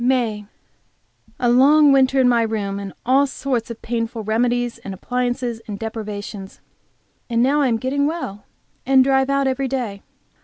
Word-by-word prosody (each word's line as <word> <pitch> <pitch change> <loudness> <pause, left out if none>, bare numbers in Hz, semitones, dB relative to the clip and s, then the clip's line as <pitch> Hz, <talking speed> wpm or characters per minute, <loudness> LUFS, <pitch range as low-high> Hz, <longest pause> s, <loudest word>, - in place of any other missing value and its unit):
MAY. 235 -5 0 0.9
A 245 - +1
long 285 +5 +6
winter 270 0 +4
in 255 - +4
my 240 -1 +3
room, 205 -3 -2
and 200 -1 -6
all 270 +3 +4
sorts 255 -4 -3
of 235 - -9
painful 230 -1 -3
remedies 240 +2 0
and 195 -4 -7
appliances 245 +1 -2
and 205 -2 -5
deprivations. 210 -3 -7 0.7
And 235 0 +2
now 285 +3 +2
I 275 - +3
am 230 -2 +1
getting 275 +4 0
well, 250 - -5 0.4
and 265 0 +5
drive 265 0 +2
out 275 0 +1
every 265 0 0
day. 240 -7 -4
245 Hz, 160 wpm, -21 LUFS, 220-265 Hz, 0.9 s, long